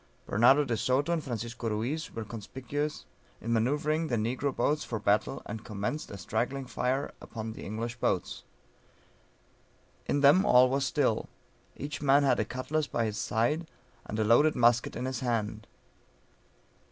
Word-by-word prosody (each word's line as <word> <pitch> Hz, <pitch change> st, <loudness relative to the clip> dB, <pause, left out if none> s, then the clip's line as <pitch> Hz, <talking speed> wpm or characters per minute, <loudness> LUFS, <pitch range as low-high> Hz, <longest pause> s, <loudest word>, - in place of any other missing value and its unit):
Bernardo 130 Hz, +7 st, +5 dB
de 120 Hz, -4 st, -1 dB
Soto 130 Hz, +8 st, +1 dB
and 160 Hz, -3 st, -1 dB
Francisco 115 Hz, -1 st, -4 dB
Ruiz 120 Hz, +9 st, -2 dB
were 115 Hz, -1 st, -4 dB
conspicuous, 130 Hz, +7 st, -5 dB, 0.3 s
in 115 Hz, +1 st, -2 dB
manoeuvring 150 Hz, +7 st, +1 dB
the 120 Hz, -, 0 dB
negro 125 Hz, +6 st, -1 dB
boats 150 Hz, +5 st, +1 dB
for 115 Hz, -, -3 dB
battle, 105 Hz, +6 st, +1 dB
and 110 Hz, -1 st, -6 dB
commenced 105 Hz, +9 st, -4 dB
a 100 Hz, -, -7 dB
straggling 120 Hz, +9 st, -2 dB
fire 130 Hz, +2 st, -1 dB
upon 110 Hz, -1 st, -6 dB
the -, -, -9 dB
English 115 Hz, +3 st, -4 dB
boats. -, -, -1 dB, 1.7 s
In 145 Hz, -, +1 dB
them 145 Hz, +7 st, +6 dB
all 125 Hz, -8 st, +6 dB
was 135 Hz, 0 st, +1 dB
still, 135 Hz, -8 st, 0 dB, 0.5 s
each 145 Hz, +1 st, -5 dB
man 140 Hz, 0 st, +5 dB
had 130 Hz, -3 st, +3 dB
a 110 Hz, -, +1 dB
cutlass 145 Hz, +6 st, -2 dB
by 115 Hz, -, -1 dB
his 110 Hz, 0 st, -3 dB
side, 135 Hz, +12 st, 0 dB, 0.4 s
and 105 Hz, -, -4 dB
a 110 Hz, -, +2 dB
loaded 120 Hz, +8 st, +4 dB
musket 120 Hz, -1 st, +3 dB
in 125 Hz, -, -3 dB
his 130 Hz, 0 st, -3 dB
hand. 110 Hz, -4 st, -2 dB
125 Hz, 155 wpm, -29 LUFS, 110-145 Hz, 1.7 s, them